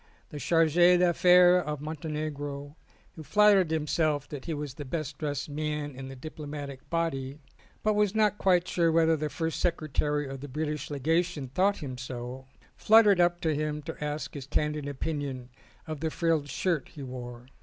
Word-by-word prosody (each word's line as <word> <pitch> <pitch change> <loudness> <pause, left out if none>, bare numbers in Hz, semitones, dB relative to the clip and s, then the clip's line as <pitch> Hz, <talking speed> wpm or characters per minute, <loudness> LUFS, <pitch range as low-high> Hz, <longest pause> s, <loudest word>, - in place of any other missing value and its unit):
The 150 - -7
Charge 165 +2 +2
d' 175 +1 +6
Affaires 180 +1 +6
of 150 -1 -3
Montenegro, 145 -2 -5 0.4
who 160 - -11
flattered 205 +1 +4
himself 155 -2 0
that 145 -3 -7
he 165 - -2
was 145 -2 -5
the 145 - -7
best 155 +1 -5
dressed 145 -3 -3
man 150 0 -3
in 135 0 -7
the 135 - -8
diplomatic 145 -1 -8
body, 145 -5 -2 0.5
but 215 - +3
was 210 -1 +1
not 210 -1 +2
quite 180 -2 +3
sure 170 -2 +2
whether 165 0 +4
the 155 0 -3
first 160 +1 -3
secretary 150 -3 0
of 135 -1 -7
the 145 - -6
British 150 +1 -3
Legation 155 0 0
thought 190 +6 +1
him 130 -3 -6
so, 130 0 -7 0.3
fluttered 210 -3 +6
up 175 0 +2
to 160 -2 +1
him 150 0 -2
to 150 - -6
ask 150 -1 -4
his 140 -3 -7
candid 150 0 -1
opinion 140 -3 -4 0.4
of 155 -2 -5
the 160 +1 -1
frilled 160 -3 0
shirt 165 +1 -1
he 145 - -9
wore. 125 -2 -8
150 Hz, 175 wpm, -28 LUFS, 140-170 Hz, 0.5 s, d